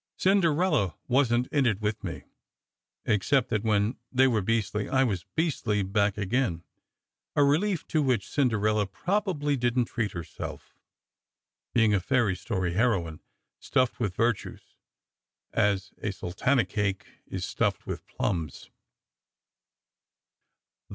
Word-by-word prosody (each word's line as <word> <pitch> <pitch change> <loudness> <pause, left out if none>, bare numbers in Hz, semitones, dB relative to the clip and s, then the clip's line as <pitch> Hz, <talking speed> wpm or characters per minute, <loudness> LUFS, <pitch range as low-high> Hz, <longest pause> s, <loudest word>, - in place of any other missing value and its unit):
Cinderella 175 - +2
wasn 125 -2 +3
t - - -14
in 140 -4 +3
it 105 -4 +1
with 105 0 -2
me, - - -5 0.8
except 120 +5 +2
that 110 -2 0
when 105 +1 +1
they 130 +1 +5
were 115 -4 +2
beastly, 105 0 -1
I 135 0 +3
was 95 -8 -2
beastly 125 - 0
back 100 +1 +1
again; 105 -4 0 0.7
a 145 - +5
relief 165 +6 +2
to 155 - +1
which 125 -8 +1
Cinderella 110 -6 +1
probably 170 - -1
didn 125 -1 +1
t - - -19
treat 110 -4 -1
herself, 85 -2 -7 1.0
being 110 -3 +3
a 100 - +3
fairy 115 -1 +1
story 95 -2 -2
heroine, 95 -7 +1 0.4
stuffed 130 -1 0
with 105 -6 -1
vir 120 +3 +3
tues - - -12 0.8
as 100 -3 +1
a 105 - -1
sultana 100 +7 0
cake 100 0 -2 0.2
is - - -4
stuffed - - -1
with - - -6
plums. 85 -5 -3
110 Hz, 130 wpm, -27 LUFS, 100-130 Hz, 1.0 s, they